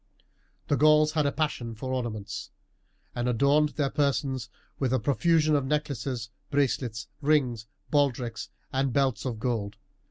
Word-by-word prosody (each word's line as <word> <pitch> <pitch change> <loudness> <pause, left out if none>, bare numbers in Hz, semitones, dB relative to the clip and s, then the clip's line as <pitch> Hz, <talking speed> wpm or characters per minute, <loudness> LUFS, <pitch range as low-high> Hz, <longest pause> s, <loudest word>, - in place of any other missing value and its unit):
The 145 - +2
Gauls 155 +1 +5
had 155 -2 +1
a - - +1
passion 130 -7 -2
for 130 +4 -4
ornaments, 115 -5 -4 0.6
and 120 +1 -1
adorned 140 +5 +3
their 140 -3 0
persons 135 -4 0 0.3
with 130 -3 0
a 130 - +3
profusion 155 +4 +3
of 140 - +2
necklaces, 135 -5 -2 0.2
bracelets, 130 -4 0
rings, 130 -7 +1 0.2
baldricks, 130 -5 0 0.2
and 135 0 +1
belts 135 -3 +1
of 120 -4 -2
gold. 110 -3 -2
135 Hz, 135 wpm, -28 LUFS, 120-145 Hz, 0.6 s, Gauls